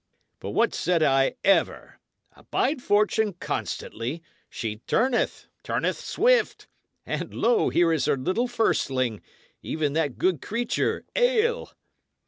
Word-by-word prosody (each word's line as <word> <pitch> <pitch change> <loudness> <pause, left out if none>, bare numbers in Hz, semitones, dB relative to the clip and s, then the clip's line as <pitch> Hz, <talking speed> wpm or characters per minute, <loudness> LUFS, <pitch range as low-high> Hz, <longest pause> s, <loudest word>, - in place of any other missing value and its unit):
But - - -6
what - - +1
said 170 -1 +1
I 135 -2 +3
ever? 195 - +1 0.4
Abide 285 -3 -1
Fortune 210 -1 +2
constantly; 155 -3 -4 0.3
she 110 -2 -4
turneth, 250 +1 +1 0.2
turneth - - -1
swift. - - +1 0.4
And - - -4
lo! 470 -4 +2
here 170 -1 +3
is 160 - 0
her - - +2
little 185 - 0
firstling 130 - 0 0.4
even 150 -3 -2
that 150 -5 -1
good 180 -6 +1
creature, 230 +2 -1
ale!" 485 -1 +1
185 Hz, 115 wpm, -25 LUFS, -, 0.4 s, I